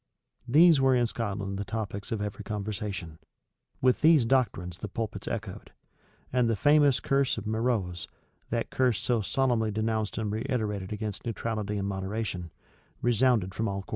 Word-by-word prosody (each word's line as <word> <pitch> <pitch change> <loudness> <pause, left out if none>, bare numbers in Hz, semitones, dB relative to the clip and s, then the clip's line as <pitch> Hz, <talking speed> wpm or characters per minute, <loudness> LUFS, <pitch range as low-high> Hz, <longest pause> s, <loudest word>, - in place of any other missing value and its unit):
These 155 +3 +6
were 135 -1 +4
in 120 -1 +3
Scotland 100 -4 -3
the - - -1
topics 100 -1 -5
of 110 -2 -1
every 105 +1 -5
conversation: 100 -5 -5 0.6
with 130 -1 +3
these 155 -6 +6
doctrines 110 -9 0
the - - -4
pulpits 110 +1 -5
echoed: - - -5 0.6
and 125 -2 +3
the 115 - +2
famous 145 +4 +4
curse 135 -2 +1
of 110 - -5
Meroz, 110 -5 -1 0.4
that 115 0 -2
curse 125 -6 +2
so 120 -3 +1
solemnly 120 0 +1
denounced 110 0 -1
and 110 -2 -1
reiterated 110 -4 -2
against 105 -1 -4
neutrality 110 -3 -3
and 100 0 -2
moderation, 95 -2 -3 0.5
resounded 120 -5 +2
from 110 +3 -1
all 100 -1 -3
quarters. - - -20
110 Hz, 155 wpm, -28 LUFS, 100-120 Hz, 0.6 s, These